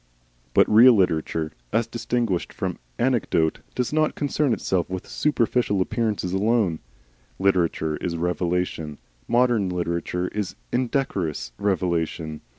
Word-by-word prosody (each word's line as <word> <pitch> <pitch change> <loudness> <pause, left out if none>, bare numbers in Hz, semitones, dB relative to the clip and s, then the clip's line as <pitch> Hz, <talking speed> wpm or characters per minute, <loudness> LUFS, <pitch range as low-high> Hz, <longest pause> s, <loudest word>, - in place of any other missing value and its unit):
But - - +6
real 115 +3 +8
literature, 80 -4 0 0.2
as 115 - +2
distinguished 115 -4 -1
from - - -3 0.2
anecdote, 115 -10 +1 0.2
does 125 +2 -1
not 155 0 +2
concern 145 -1 0
itself 95 -4 0
with 95 0 -5
superficial 120 -7 +1
appearances 105 -2 -1
alone. 100 -4 +1 0.6
Literature 85 -5 +1
is 85 -1 -3
revelation. 85 -3 -1 0.3
Modern 120 -5 +2
literature 90 0 -2
is 105 -3 -4 0.2
indecorous 110 - -1
revelation. 85 -5 -1
95 Hz, 110 wpm, -24 LUFS, 85-120 Hz, 0.6 s, real